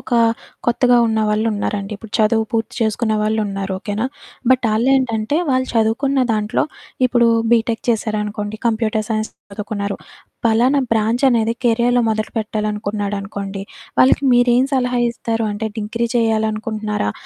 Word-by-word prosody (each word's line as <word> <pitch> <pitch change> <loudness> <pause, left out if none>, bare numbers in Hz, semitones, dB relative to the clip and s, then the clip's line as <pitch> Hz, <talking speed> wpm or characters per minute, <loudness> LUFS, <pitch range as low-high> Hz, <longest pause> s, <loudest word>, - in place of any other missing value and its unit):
ఒకా 240 -2 +1 0.5
కొత్తగా 245 +1 +4
ఉన్న 220 -1 0
వాళ్ళున్నారండి. 210 -1 -1
ఇప్పుడు 215 0 -13
చదువు 220 +1 +3
పూర్తి 225 -1 -1
చేసుకునే 220 0 +1
వాళ్ళున్నారు, 205 -3 -1
ఓకేనా? 210 +5 -2 0.4
బట్, 255 -1 +4
ఆళ్ళేంటంటే, 240 +1 +1
వాళ్ళు 260 0 +1
చదువుకున్న 235 +5 +2
దాంట్లో 215 0 0 0.4
ఇప్పుడూ 240 -1 +3 0.2
బీటెక్ 230 -1 +2
చేశారనుకోండి, 210 -2 -1
కంప్యూటర్ 220 -1 0
సైన్స్ 215 -1 -1 0.2
చదువుకున్నారు. 200 -1 -4 0.5
పలానా 245 +5 +3
బ్రాంచనేది 230 +1 +2
కెరియాలో 240 +1 +3
మొదలుపెట్టాలనుకున్నాడనుకోండి, 210 -2 -3 0.4
వాళ్ళకి 265 +2 +4
మీరేం 245 +1 +4
సలహా 250 -2 +1
ఇస్తారు? 230 -1 -2
అంటే, 220 +2 -3
డిగ్రీ 230 +2 -2
చెయ్యాలనుకుంటన్నారా, 215 - 0
220 Hz, 110 wpm, -19 LUFS, 210-235 Hz, 0.5 s, కొత్తగా